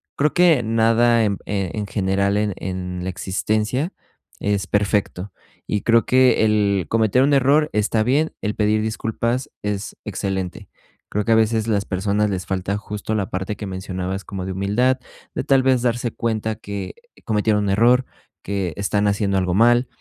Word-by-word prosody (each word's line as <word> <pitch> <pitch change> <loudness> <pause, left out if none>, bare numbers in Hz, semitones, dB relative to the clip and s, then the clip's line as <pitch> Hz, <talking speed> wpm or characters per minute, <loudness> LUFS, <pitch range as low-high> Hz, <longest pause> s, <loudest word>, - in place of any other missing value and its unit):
Creo 150 +1 +1
que 175 -7 +5
nada 115 +1 +3
en 100 -2 0
p - - -23
e 100 -4 -2
en 105 -1 -3
general, 100 0 0
en 105 -1 0
en 90 -1 -5
la 95 - -3
existencia, 110 - -1 0.5
es 100 -1 -1
perfecto 100 -2 0 0.3
y 105 - -1
creo 115 0 +3
que 130 -3 +4
el 100 -4 +2
cometer 115 +3 +3
un 145 +1 +3
error 140 +3 +3
está 105 +1 +1
bien. 145 +7 +1
El 105 -1 -1
pedir 105 0 +2
disculpas 115 +3 -2
es 105 0 -3
excelente. 95 -3 -4 0.4
Creo 105 - -1
que 115 - +1
a - - +6
veces 110 0 +2
las 100 -3 0
personas 100 +3 0
les 95 -2 -3
falta 95 +1 -2
justo 105 +1 -4
la 100 -3 -1
parte 95 +3 -3
que 105 - -7
mencionabas, 95 0 -4
como 95 -2 -5
de 95 - -4
humildad, 105 +8 +1 0.3
de - - -2
tal 135 -2 +4
vez 130 -2 +3
darse 120 -1 -1
cuenta 110 -1 -2
que 100 -3 -6 0.3
cometieron 105 -1 +1
un 100 - -1
error, 120 +6 +4 0.4
que 95 -4 -3
están 100 +1 0
haciendo 100 -1 +1
algo 90 -1 0
mal, 120 +5 +4
105 Hz, 175 wpm, -21 LUFS, 100-115 Hz, 0.5 s, a